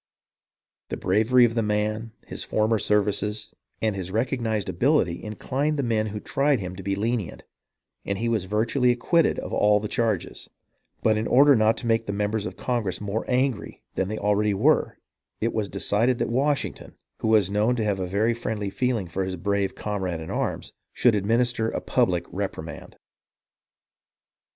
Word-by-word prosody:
The - - -3
bravery 110 +6 +4
of 115 - 0
the 115 - +1
man, 105 +1 -1
his - - -6
former 110 +1 +1
services, 105 +1 0 0.3
and 110 -2 +1
his 95 -2 -4
recognized 110 -1 -1
ability 105 - +1
inclined 135 +8 -2
the 140 - 0
men 110 -3 0
who 105 0 -5
tried 140 +3 +1
him 90 -1 -5
to 95 - -8
be 100 +1 -1
lenient, 110 -2 -2 0.6
and 100 - -2
he 115 - -1
was 110 -5 0
virtually 115 +6 +1
acquitted 155 +7 +2
of 105 0 +2
the - - -1
charges; 110 -5 -2 0.5
but 110 -1 +3
in 110 - -1
order 140 +2 +6
not 110 0 +3
to - - -7
make 115 0 +1
the 100 - -2
members 105 +1 -1
of - - -8
Congress 120 -7 -2
more 105 +2 -3
angry 130 -3 -1
than 95 - -1
they 110 +2 -4
already 105 0 +1
were, 140 +10 +2 0.4
it 115 +1 -1
was 105 -3 -1
decided 120 +5 +1
that - - -1
Washington, 140 +3 -1 0.2
who - - -2
was 105 -4 +4
known 105 +4 +2
to 115 - -1
have 100 -2 0
a 90 - -2
very 105 +5 +1
friendly 110 -3 -3
feeling 120 -6 -1
for 95 +3 -2
his 95 0 -3
brave 100 +2 -1
com 105 -2 -3
rade 90 -3 -2
in 80 - -7
arms, - - -3 0.2
should 120 - +3
administer 115 +2 +1
a - - -3
public - - +1
reprimand. - - -6
110 Hz, 175 wpm, -25 LUFS, 100-120 Hz, 0.6 s, order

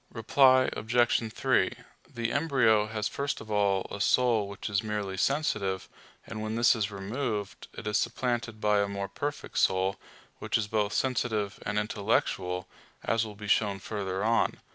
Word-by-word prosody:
Reply 130 +3 +4
Obj. 115 0 +1
3: - - +2 0.4
The 115 -1 -2
embryo 125 -8 +3
has 110 -1 -2
first 140 0 -3
of 110 -1 -10
all 100 -2 +2
a 100 - -5
soul 115 -4 +3
which 100 0 -6
is 100 -1 0
merely 105 -3 -3
sensitive, 100 -7 0 0.4
and 110 - -6
when 110 +1 -3
this 120 +1 +5
is 105 -3 -1
removed, 105 +1 -4
it - - -9
is 105 0 +1
supplanted 115 -2 -2
by 105 -1 +3
a 100 - +1
more 100 0 -4
perfect 145 +9 -4
soul, 95 +1 +2 0.4
which - - 0
is 105 - -2
both 105 -1 0
sensitive 110 -6 -1
and 105 0 -1
intellectual: 100 -4 -1 0.4
as 115 -1 +1
will 105 - -9
be 105 0 -8
shown 100 -1 +2
further 95 -1 -4
on 115 +1 +2
(Q. - - -19
110 Hz, 165 wpm, -29 LUFS, 100-115 Hz, 0.4 s, this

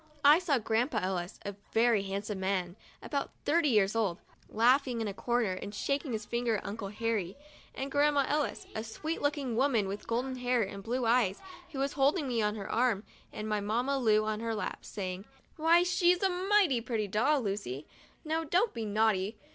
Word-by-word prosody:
I 295 +3 +8
saw 330 -7 +1
Grandpa 225 +2 0
Ellis, 185 -1 -3
a 200 - -3 0.2
very 225 -2 +4
handsome 200 +1 -4
man, 190 -2 -1 0.3
about 280 -2 -2 0.2
thirty 320 -1 +3
years 210 -3 +3
old, 205 -7 0 0.3
laughing 250 +2 +3
in 225 - -1
a 200 - -3
corner 235 -1 0
and 200 +3 -7
shaking 275 +5 -1
his 215 -1 -3
finger 235 -1 0
at - - -8
Uncle 200 0 -4
Harry, 210 -2 -2 0.4
and 270 +1 -4
Grandma 285 -1 +3
Ellis, 295 0 -1
a 220 - -3
sweet 310 +9 -4
looking 285 -5 -1
woman 235 -5 +2
with 200 +2 -6
golden 255 +3 -1
hair 245 -1 +1
and 195 0 -6
blue 240 +4 -2
eyes, 225 -5 +2 0.3
was 275 -1 -2
holding 285 +2 +2
me 235 -3 0
on 210 0 0
her 200 -3 -6
arm 230 -3 +2 0.3
and 215 0 -5
my 210 -1 0
Mamma 245 +7 0
Lu 215 -3 +3
on 215 0 -2
her 225 0 -2
lap, 210 -3 -3
and - - -20
saying: 190 -1 -5 0.3
'Why 330 +2 +4
she's 360 0 +3
a 385 - +4
mighty 365 - +2
pretty 225 -3 -2
dolly, 235 +2 +1
Lucy. 145 -8 -5 0.4
Now 320 +1 0
don't 360 +8 +1
be 225 -1 -4
naughty 210 -1 +1
230 Hz, 190 wpm, -31 LUFS, 205-275 Hz, 0.4 s, I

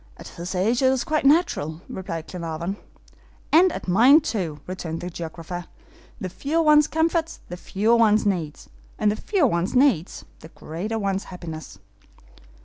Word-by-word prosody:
"At - - -10
his 175 +3 -6
age 220 +7 +1
it 260 -1 +4
is 265 -2 0
quite 310 -4 +1
natural," 225 - +2
replied 170 -4 -6
Glenarvan. 170 +2 -5 0.7
"And 355 +3 +6
at - - -7
mine, 240 - +6
too," 180 - -3
returned 170 -3 -5
the 180 - -6
geographer. 170 +1 -7 0.5
"The 185 - -4
fewer 300 - -1
one's 300 -1 +5
comforts, 325 +1 0
the 175 - -5
fewer 215 +6 +1
one's 215 -2 +4
needs; 170 -7 -2 0.3
and 210 -1 +2
the - - -2
fewer 380 - +1
one's 180 -2 0
needs, 250 - +2
the 160 - -12
greater 180 +9 -5
one's 195 -2 -2
happiness." 160 - -8
195 Hz, 155 wpm, -23 LUFS, 170-270 Hz, 0.7 s, And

